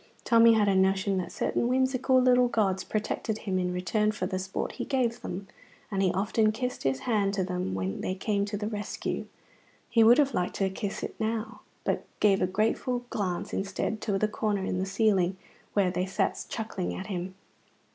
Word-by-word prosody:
Tommy 230 0 +6
had 215 -2 +3
a 200 - +4
notion 190 +1 +2
that 175 - -4
certain 235 - 0
whimsical 260 0 +3
little 250 -1 +5
gods 195 -5 +1
protected 215 0 -2
him 190 -4 -2
in 180 0 0
return 200 +4 +1
for 195 -3 -3
the 185 0 -2
sport 190 +1 -3
he - - -5
gave 245 -3 0
them, 195 +2 -5 0.4
and 195 -1 0
he 185 -2 +3
often 215 +3 +2
kissed 250 +3 -3
his 135 0 0
hand 205 -4 +1
to 190 - +1
them 180 - -2
when 95 0 -3
they 185 - -2
came 200 +1 0
to 205 0 -4
the 210 - -3
rescue. 210 -1 -4 0.6
He 230 -1 +5
would 235 +3 +7
have 280 -2 +3
liked 180 - -1
to 195 -1 0
kiss 195 +1 -4
it - - -4
now, 220 +1 -2 0.2
but - - -1 0.2
gave 200 -2 +4
a 185 - +3
grateful 225 +5 0
glance 185 -4 -2
instead 200 +2 -2
to 205 -3 0
the 215 - +2
corner 210 -2 -1
in 185 - -1
the 190 - -1
ceiling 195 -3 +2 0.4
where 195 -3 +3
they 180 +1 -1
sat 190 - -1
chuckling 215 -5 -3
at 190 - -5
him. 185 -2 -4
200 Hz, 195 wpm, -28 LUFS, 190-225 Hz, 0.6 s, would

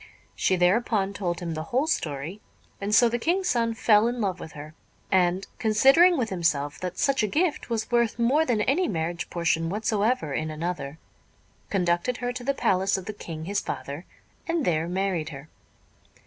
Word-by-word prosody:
She 190 - +2
thereupon 195 +2 +2
told 175 -4 -3
him 170 -2 -3
the 155 0 -4
whole 255 - 0
story; 160 - -3 0.4
and 200 - -2
so 240 - +6
the 240 +1 -1
King's 360 +7 0
son 230 -3 +1
fell 225 -2 +4
in 240 +1 -2
love 190 -4 -1
with 160 - -9
her; 150 +1 -9 0.4
and, 185 0 +2
considering 270 +11 +5
with 230 -5 -1
himself 150 -5 0
that 180 -1 -5
such 275 -2 +2
a 215 - +1
gift 310 - 0
was 230 0 -2
worth 235 -2 +2
more 255 +7 +3
than 240 -8 0
any 305 - +2
marriage 170 0 -3
portion 165 -1 0
whatsoever 210 - 0
in 155 +3 -2
another, 155 -2 -4 0.7
conducted 180 +5 0
her 245 0 -3
to 245 0 -6
the 275 +2 0
palace 190 -4 +1
of 190 - -7
the 215 - -5
King 160 -5 -7
his 200 +3 -1
father, 145 +5 -6 0.4
and 330 -3 0
there 165 -1 +1
married 180 -3 -1
her. 140 0 -10
195 Hz, 180 wpm, -26 LUFS, 170-240 Hz, 0.7 s, so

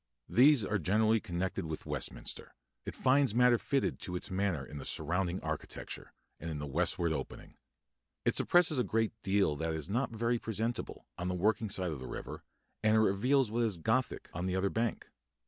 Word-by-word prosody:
These 130 -2 +6
are 100 0 0
generally 110 +5 +3
connected 95 -2 -3
with 80 -1 -5
Westminster; - - -4 0.3
it - - -4
finds 135 -3 +3
matter 125 -1 +5
fitted 140 -2 0
to 90 - -4
its 90 - -4
manner 95 -7 0
in 75 +3 -8
the - - -7
surrounding 90 +4 -1
architecture, 80 -1 -5 0.3
and 85 - -5
in 80 - -3
the 75 - -4
westward 80 +4 0
opening. - - -6 0.7
It - - +3
suppresses 175 -5 +4
a - - +3
great 110 -1 0
deal 95 -6 +2
that 80 +1 -2
is 80 +2 -5
not 120 +7 0
very 115 +1 0
presentable, 115 +2 -3
on 90 - -2
the 90 - -1
working 105 +4 +1
side 95 -3 -1
of 75 - -5
the 65 - -7
river, - - -7 0.4
and 110 0 +4
it - - +5
reveals 110 +4 +3
what 120 +2 0
is 110 -6 0
Gothic 80 - 0
on 90 +2 -2
the 90 - -1
other 95 +1 +1
bank. 115 0 -1
100 Hz, 190 wpm, -32 LUFS, 85-115 Hz, 0.7 s, These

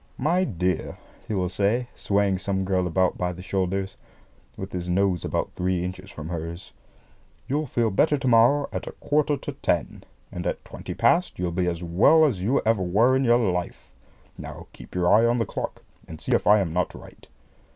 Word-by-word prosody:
"My 170 +7 +1
dear," 90 - -2 0.3
he 110 - -2
will 90 -2 0
say, 105 +7 0
swaying 100 -2 +1
some 95 0 -2
girl 95 -1 +1
about 90 +1 +1
by 90 0 0
the 90 +1 -9
shoulders, 95 +1 -2 0.6
with 95 +1 -6
his 90 -1 -4
nose 90 -1 +1
about - - -2
three 90 -1 -1
inches 95 +1 -7
from 80 -4 -8
hers, 85 0 -6 0.7
"you'll 145 +3 -1
feel 115 -3 0
better 145 +9 +3
to 135 -1 -3
morrow 125 +5 +4
at - - -4
a - - -6
quarter 150 0 0
to 140 - -6
ten, 85 - -2 0.3
and 90 0 -4
at - - -3
twenty - - -8
past 180 +1 +2
you'll 90 -1 -2
be 90 +1 0
as 85 0 -2
well 105 - +5
as 130 -10 +1 0.3
ever 110 -3 +2
you - - -3
were 115 +8 +4
in 135 - +2
your 120 -5 +3
life. 90 0 -5 0.5
Now, - - -8
keep - - -13
your 90 -1 +1
eye 115 +3 +5
on 120 +1 +2
the 115 - 0
clock, - - -5 0.2
and 80 -1 -9
see - - -5
if - - +2
I 105 0 +6
am 85 -4 -2
not 90 +1 -1
right." - - -14
95 Hz, 200 wpm, -25 LUFS, 90-120 Hz, 0.7 s, I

